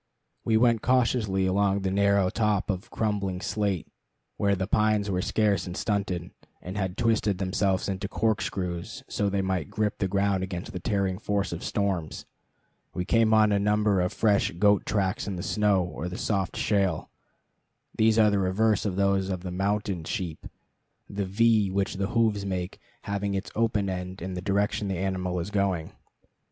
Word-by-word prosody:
We 110 -1 +3
went 115 -1 +3
cautiously 115 -6 +2
along 100 +1 +2
the 95 -1 -1
narrow 100 -1 +3
top 105 -2 +1
of 95 0 -6
crumbling 100 -4 -1
slate, 100 -3 -1 0.5
where 100 -1 +2
the 95 0 -2
pines 105 0 +2
were 90 -1 0
scarce 100 -3 +1
and 90 - -5
stunted, 95 -4 -2 0.3
and 90 +2 -7
had 95 -2 -2
twisted 110 -4 +1
themselves 95 0 0
into 95 0 -3
corkscrews 95 -5 -2
so 100 -1 0
they 100 0 0
might 95 -6 -1
grip 105 -1 -1
the 95 - +1
ground 100 0 +1
against 90 -1 -5
the 90 - -4
tearing 95 -2 -1
force 100 -2 -1
of 85 - -6
storms. 95 -6 -2 0.7
We 90 - -2
came 115 +2 +3
on 110 -1 +5
a 100 - +3
number 105 -1 +2
of 90 - 0
fresh 105 -3 +2
goat 100 +3 +3
tracks 95 -2 0
in 100 - -3
the 90 - -5
snow 105 -3 +2
or 90 0 -5
the 90 - -6
soft 95 -4 -1
shale. 95 -6 0 0.8
These 110 0 +3
are 105 -2 +5
the 100 - +2
reverse 100 +3 +1
of 95 - -2
those 100 -1 +1
of 90 -2 -3
the 90 - -4
mountain 100 -1 -1
sheep, 85 -3 -4 0.6
the 100 0 -3
V 105 +1 +3
which 95 0 -1
the 100 0 0
hoofs 110 -3 +1
make 95 -2 -4 0.2
having 100 0 -2
its 95 - -4
open 110 -3 +1
end 90 0 -4
in 95 +2 -5
the 90 - -4
direction 100 +2 0
the 95 -2 -2
animal 90 -1 -2
is 90 +4 -4
going. 95 -5 0
100 Hz, 175 wpm, -27 LUFS, 95-105 Hz, 0.8 s, on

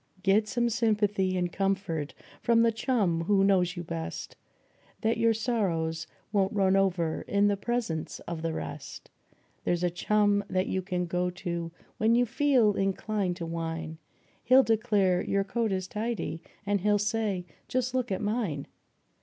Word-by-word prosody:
Get 205 +3 +3
some 240 +1 +1
sympathy 210 -5 +1
and 175 -1 -1
comfort 195 -6 -1 0.3
from 230 -1 +4
the 230 - +4
chum 205 -8 0
who 195 +1 +3
knows 185 -2 +2
you 175 - -3
best, 165 -1 -5 0.7
Then 225 0 +1
your 230 0 +3
sorrows 170 -9 -1 0.2
won't 195 -2 +2
run 195 -2 +3
over 180 -5 +1
in 200 0 +3
the 205 - +2
presence 200 -6 -2
of 170 -2 -5
the 165 0 -1
rest; - - -7 0.5
There's 175 0 0
a 175 - +2
chum 205 +3 +2
that 185 0 +1
you 190 - -1
can 180 -1 -2
go 180 +1 0
to 170 -1 -4 0.3
when 225 +2 +4
you 245 +1 +4
feel 245 -3 +3
inclined 195 -1 -1
to 170 -2 -5
whine, 165 -1 -4 0.4
He'll 260 +2 +6
declare 205 -5 +2
your 195 0 0
coat 225 +2 -1
is 185 -1 -2
tidy, 215 -6 -3 0.2
and 200 -1 +1
he'll 210 +1 +3
say: 210 -3 -1 0.2
"Just 255 0 -1
look 255 -3 -1
at 190 - -1
mine 205 - -1
195 Hz, 160 wpm, -28 LUFS, 175-220 Hz, 0.7 s, He'll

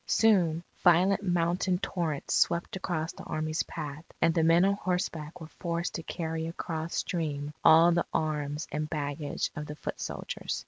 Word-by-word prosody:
Soon, 175 -7 +3 0.2
violent 185 +3 +5
mountain 180 0 +1
torrents 165 -6 -2
swept 170 +2 +2
across 165 -4 -2
the - - -11
Army's 155 0 -1
path; 150 -2 -6 0.2
and 165 - +4
the 165 - +2
men 165 +3 +5
on 200 - +3
horseback 180 -5 -3
were 160 - -7
forced 170 +1 -3
to 165 - -3
carry 160 -1 -3
across 165 -1 -4
stream 150 -4 -2
all 165 +2 +8
the 170 0 +2
arms 150 -1 -1
and 150 +1 -2
baggage 145 -1 -2
of 150 -1 -5
the 150 - -6
foot - - -6
soldiers. - - -4
165 Hz, 165 wpm, -29 LUFS, 155-175 Hz, 0.2 s, all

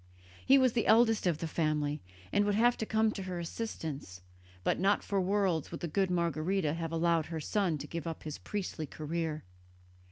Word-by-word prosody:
He 270 - +6
was 255 -3 +4
the 230 - +1
eldest 225 -3 +5
of 170 -4 +2
the 165 - -3
family 150 -2 0 0.3
and 205 - +4
would 205 0 +1
have 240 +3 +4
come 220 0 +2
to 200 - -5
her 185 -1 -4
assistance, 160 - -5 0.4
but - - +1
not 195 +3 +2
for 200 -1 0
worlds 185 -4 +1
would 165 - -7
the 170 - -2
good 190 +4 +1
Margherita 170 -1 0
have 165 -1 -3
allowed 165 -1 +2
her 165 -1 -4
son 180 0 0
to 145 - -6
give 170 +1 -5
up 165 - -5
his 155 -1 -6
priestly 180 -6 -4
career. 155 0 -3
170 Hz, 190 wpm, -32 LUFS, 155-205 Hz, 0.4 s, He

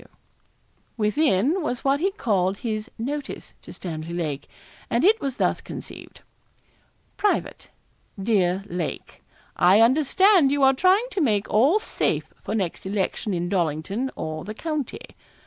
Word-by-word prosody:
W.' - - -23 0.8
Within 260 - +2
was 250 -6 -3
what 275 +1 +2
he 380 +5 +2
called 200 - 0
his 215 +1 -3
'notice' 280 +5 -5
to - - -12
Stanley 165 -1 -6
Lake, 150 -5 -3 0.4
and 235 +7 +2
it 440 +3 +4
was 270 -3 -2
thus - - 0
conceived: - - -10 1.0
'Private. 415 - -1 0.5
'DEAR 190 -3 +1
LAKE 175 -4 -5 0.3
I 185 +4 +5
understand 300 - +4
you 285 -1 +1
are 265 0 +6
trying 375 - +3
to 390 - -1
make 210 -8 +1
all 275 - +4
safe - - -2
for 215 - -3
next 190 -3 -3
election 195 0 -2
in 175 0 -2
Dollington 180 - -1
or 155 0 -5
the 215 +3 -7
county. 305 -1 -4
225 Hz, 140 wpm, -24 LUFS, 185-290 Hz, 1.0 s, are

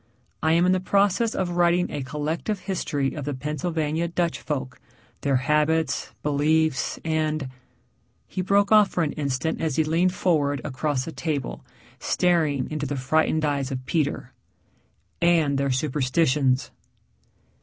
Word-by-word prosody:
I 160 0 +3
am 170 +2 +4
in 185 - +4
the 185 - +2
process 200 +4 +2
of 180 -2 -1
writing 175 0 +2
a 145 - -3
collective 155 +9 -3
history 150 -8 -2
of 150 - -5
the 145 0 -3
Pennsylvania 155 +3 -2
Dutch 170 0 -1
folk, 135 -4 -4 0.4
their 140 -1 +1
habits, 150 +2 +1
beliefs, 150 0 +1
and 155 -3 -1 0.4
" - - -42
he 185 - -3
broke 200 +2 +2
off 210 -2 +6
for 175 - 0
an 150 - -1
instant 140 +1 -2
as 160 -4 -1
he 160 - +3
leaned 170 +4 +1
forward 145 -6 +1
across 135 -1 -2
the 165 - -6
table, 150 -5 -3 0.4
staring 155 -7 +1
into 150 -1 -2
the 145 +1 -3
frightened 155 +4 +1
eyes 140 -2 -1
of 130 -2 -5
Peter 150 -2 -1 0.5
" - - -42
and 160 -5 +3
their 140 0 0
superstitions." 130 0 +1
155 Hz, 150 wpm, -24 LUFS, 140-170 Hz, 0.5 s, off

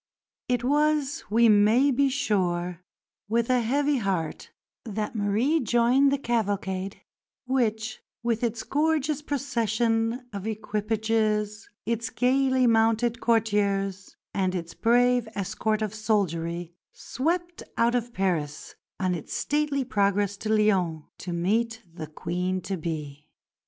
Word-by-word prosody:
It 245 -1 +1
was, 295 +2 +1
we 230 +2 +5
may 220 +6 +5
be 275 +2 +3
sure, 180 -9 -1 0.5
with 235 +2 +1
a 250 -1 +3
heavy 280 +5 +1
heart 190 -8 -2 0.3
that 215 0 -4
Marie 220 +10 +2
joined 245 +3 +3
the 280 - +2
cavalcade 200 -6 -2 0.5
which, 240 -2 -1 0.2
with 235 0 0
its 230 -1 -1
gorgeous 305 -1 0
procession 235 -4 0
of 200 +1 -5
equipages, 215 0 -1 0.2
its 230 0 -1
gaily 260 0 +2
mounted 230 +1 +2
courtiers, 200 -4 0 0.2
and 190 -2 0
its 170 -2 -5
brave 245 0 +3
escort 215 +2 -1
of 215 -1 -3
soldiery, 175 -6 -1 0.2
swept 345 +6 -2 0.2
out 235 +1 +3
of 240 -1 -1
Paris 170 -8 -2 0.3
on 185 -2 +1
its 165 -4 -5
stately 295 -2 0
progress 200 -3 +1
to 215 - -5
Lyons, 190 -7 +2 0.2
to 180 - -5
meet 225 +7 0
the 155 -2 -7
Queen 180 +4 -2
to 195 - -3
be. 150 -3 -5
220 Hz, 120 wpm, -26 LUFS, 195-245 Hz, 0.5 s, we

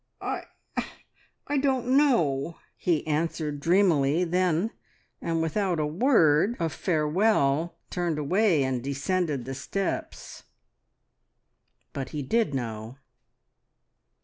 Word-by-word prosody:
"I - - -4 1.1
don't 260 -2 +1
know!" 170 - +2 0.2
he 170 -4 0
answered 155 -1 -1
dreamily 165 -2 +3
then, 180 +3 +1 0.5
and 165 -1 0
without 175 +1 0
a 150 - +1
word 175 - +3
of 165 -2 -1
farewell 160 -2 +1 0.2
turned 175 -3 -1
away 170 +1 +2
and 130 -2 -1
descended 140 0 -1
the 135 - -5
steps. 195 +8 -4 1.5
But 135 -2 -4
he 150 -2 -4
did 215 - +1
know. 115 0 -5
165 Hz, 95 wpm, -27 LUFS, 140-190 Hz, 1.5 s, dreamily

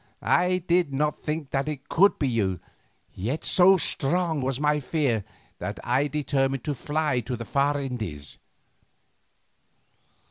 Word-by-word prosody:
I 180 0 +2
did 175 -3 +2
not 150 +2 0
think 150 -2 -4
that 135 +1 -1
it 145 -2 -5
could 200 +4 +4
be 140 - 0
you, 100 -7 0 0.5
yet 120 +12 -3
so 190 +1 +5
strong 160 0 +1
was 130 0 -2
my 150 0 +2
fear 135 -7 0 0.4
that - - -5
I 130 +4 +1
determined 135 -3 -1
to 150 - -2
fly 150 0 -1
to 125 +2 -4
the 115 0 -7
far 145 +2 +1
Indies. 110 - -5
140 Hz, 140 wpm, -26 LUFS, 125-155 Hz, 0.5 s, so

